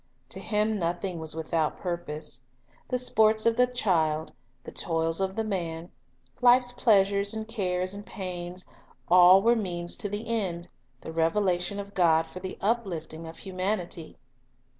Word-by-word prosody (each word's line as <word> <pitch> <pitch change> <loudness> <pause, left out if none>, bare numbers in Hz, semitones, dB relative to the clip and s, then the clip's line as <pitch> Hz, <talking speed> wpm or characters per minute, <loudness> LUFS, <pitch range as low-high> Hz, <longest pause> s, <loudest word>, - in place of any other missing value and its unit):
To 190 - -5
Him 210 +1 0
nothing 175 +1 -2
was 160 -1 -3
without 160 -1 -1
purpose. 160 -6 -5 0.5
The 250 - 0
sports 220 -3 +3
of 230 0 +3
the 250 +1 +4
child, 160 -10 0 0.3
the - - -9
toils 165 +1 0
of 190 0 -1
the 225 - -1
man, 170 -5 -4 0.5
life's 245 0 +5
pleasures 200 -3 +2
and 220 0 -4
cares 185 -4 -1
and 205 0 -7
pains, 180 -2 -6 0.4
all 180 +2 +7
were 235 +1 +5
means 175 -5 -2
to 205 - -4
the 205 +2 -4
one - - -11
end, 185 -7 -2 0.2
— 125 0 -40
the - - -7
revelation 175 +3 +1
of 200 0 -7
God 165 -3 +3
for 180 - -10
the 185 0 -6
uplifting 175 -7 -2
of 160 - -10
humanity. 185 -3 -4
185 Hz, 160 wpm, -27 LUFS, 170-210 Hz, 0.5 s, all